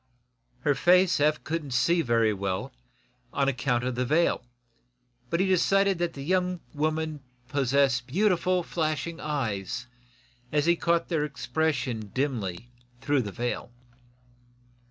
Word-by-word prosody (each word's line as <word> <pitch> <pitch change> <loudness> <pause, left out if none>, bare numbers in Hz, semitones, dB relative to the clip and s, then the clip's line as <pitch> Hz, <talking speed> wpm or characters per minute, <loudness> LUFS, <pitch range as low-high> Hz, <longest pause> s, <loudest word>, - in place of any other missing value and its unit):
Her 145 +2 +3
face 180 +3 +4
Eph 150 +1 +2
couldn't 155 -5 -3
see 170 +6 +3
very 115 -5 +2
well, 100 +6 -3 0.6
on 140 - +1
account 125 -2 0
of 125 0 -1
the 125 +1 -1
veil, 155 +2 +2 0.9
but 170 - 0
he 190 - +3
decided 195 0 +3
that 175 -1 -1
the 135 - -7
young 180 +2 0
woman 155 0 -1 0.3
possessed 135 -2 +2
beautiful, 180 +2 +2
flashing 160 0 -2
eyes, 120 -6 -3 0.7
as 150 0 +2
he 170 +1 +4
caught 170 0 +1
their 160 -4 +1
expression 130 -5 -2
dimly 120 -6 -2 0.3
through 145 +1 +1
the 105 -4 -5
veil. 120 +3 -3
145 Hz, 130 wpm, -27 LUFS, 125-170 Hz, 0.9 s, face